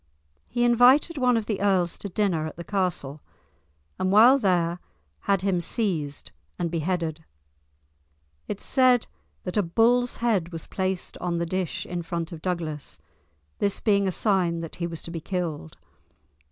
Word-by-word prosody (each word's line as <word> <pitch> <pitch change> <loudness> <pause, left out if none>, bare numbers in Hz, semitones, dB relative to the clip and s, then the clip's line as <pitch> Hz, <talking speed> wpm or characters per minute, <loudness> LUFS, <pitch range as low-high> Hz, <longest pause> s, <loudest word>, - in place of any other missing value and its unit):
He 240 - -1
invited 250 +6 +5
one 250 -2 +3
of 220 - -2
the 210 -3 -2
earls 185 -4 +2
to 200 - -5
dinner 180 -5 0
at - - -8
the 170 - -7
castle, 170 -7 -2 0.8
and 185 - +1
while 240 +7 +7
there 175 -5 +1 0.5
had 195 -2 +3
him 190 -3 +1
seized 170 - -2 0.3
and 170 - -2
beheaded. 165 -1 -2 1.2
It 205 - -5
is - - -3
said 255 -3 +4 0.4
that 180 +3 -4
a - - +5
bull's 235 +7 +2
head 200 -8 0
was 165 -2 -6
placed 190 -1 -3
on 175 -1 -2
the 170 - -1
dish 185 0 -3
in 175 -1 -4
front 170 0 -4
of 165 -2 -8
Douglas, 165 -5 -4 0.6
this 200 - +1
being 200 -2 +2
a - - +1
sign 180 -3 +1
that 165 - -7
he 170 -1 -2
was 165 -2 -6
to 165 - -7
be 165 -1 -5
killed. 165 - -4
180 Hz, 165 wpm, -25 LUFS, 170-210 Hz, 1.2 s, while